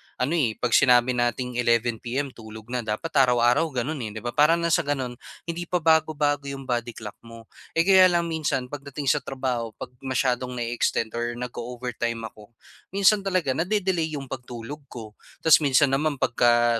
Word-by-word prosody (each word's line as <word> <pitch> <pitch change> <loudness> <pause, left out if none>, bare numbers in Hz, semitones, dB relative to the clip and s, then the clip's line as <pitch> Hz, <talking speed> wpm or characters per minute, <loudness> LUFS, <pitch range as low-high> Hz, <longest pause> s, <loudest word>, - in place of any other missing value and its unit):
ano, 125 +4 -1
eh,' 135 -10 +1
pag 120 - -2
sinabi 125 -2 +5
nating 125 0 -1
11 115 -1 +1
PM 135 +3 -3
tulog 110 0 -12
na. 125 - -1
Dapat 110 +9 -4
araw-araw 125 +2 +4
gano'n 140 +2 -3
eh, - - -7
'di 110 - -7
ba. 120 - -2
Parang 150 +3 +5
nang 170 - +1
sa - - +4
sa - - -16
gano'n, 130 -3 -2 0.3
hindi 170 +1 -5
pa 180 -2 -1
bago-bago 150 -3 +2
'yong 140 0 -6
body 120 -2 -2
clock 105 -2 -9
mo. 115 -1 -13 0.3
Eh, 165 - +4
kaya 190 0 +7
lang 170 -1 +2
minsan 155 -6 -2
pagdating 140 -1 -2
sa 150 - +1
trabaho, 125 -5 -3
'pag 130 -1 -8
masyadong 125 -1 -1
na-e-extend 120 -1 -1
or 120 0 -2
nag-o-overtime 120 -1 -4
ako, 105 +2 -18 0.4
minsan 200 +1 +4
talaga 185 -8 0
na-de-delay 175 0 0
'yong 135 -2 -6
pagtulog 125 +2 -7
ko. 110 -3 -10 0.3
Tapos 160 - +7
minsan 140 -2 +3
naman, 145 +2 +1
pagka 120 -2 +2
125 Hz, 180 wpm, -25 LUFS, 120-150 Hz, 0.4 s, kaya